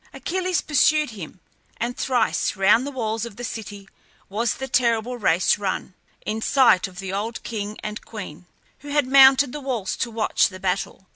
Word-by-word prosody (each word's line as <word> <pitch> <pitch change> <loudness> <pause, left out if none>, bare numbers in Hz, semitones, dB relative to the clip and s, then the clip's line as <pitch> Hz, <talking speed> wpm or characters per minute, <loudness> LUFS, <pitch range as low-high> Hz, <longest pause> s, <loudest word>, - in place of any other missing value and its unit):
Achilles 360 +6 -1
pursued 300 -1 +2
him; 185 -4 -10 0.4
and 240 +2 -3
thrice 245 -5 0
round 210 +7 +3
the - - -4
walls 225 -4 -3
of 235 -4 -7
the 245 - -8
city 205 -4 -7 0.4
was 220 +4 -1
the 265 - -5
terrible 240 -1 +1
race 185 0 +2
run, 195 -1 -3 0.3
in 220 +1 -3
sight 240 -8 +4
of 185 -2 -15
the 190 0 -5
old 220 +3 -4
king 210 -2 -5
and 210 +1 -5
queen, 180 -6 -9 0.3
who 290 - -13
had 290 -1 +1
mounted 265 0 +6
the 295 - -6
walls 240 -8 -3
to 235 - -2
watch 220 -1 +1
the 185 -1 -11
battle. 190 0 -3
225 Hz, 175 wpm, -23 LUFS, 200-265 Hz, 0.4 s, mounted